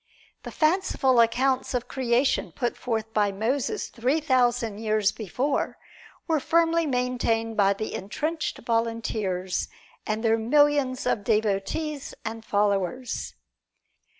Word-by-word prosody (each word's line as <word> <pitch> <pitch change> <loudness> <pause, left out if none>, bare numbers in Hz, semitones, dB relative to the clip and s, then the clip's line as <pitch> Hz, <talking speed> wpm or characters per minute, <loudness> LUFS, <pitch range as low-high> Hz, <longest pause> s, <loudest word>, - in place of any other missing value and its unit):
The - - -8
fanciful 310 -6 +2
accounts 255 +3 +2
of 245 - -2
Creation 255 +1 +1
put 245 -2 -2
forth 225 -2 -3
by 205 -1 +2
Moses 230 +7 -1
three 255 +6 0
thousand 245 -7 +1
years 215 -2 +2
before 225 +6 -2 0.5
were 320 -3 +2
firmly 330 +2 +2
maintained 245 -3 0
by 200 -1 +4
the 215 +2 -5
entrenched 305 - -3
volunteers 220 -6 -1 0.4
and 215 +1 -2
their 225 0 +3
millions 285 +1 +2
of 225 -4 0
devotees 220 +8 -1
and 225 0 -5
followers. 205 +4 -1
235 Hz, 115 wpm, -26 LUFS, 215-265 Hz, 0.5 s, by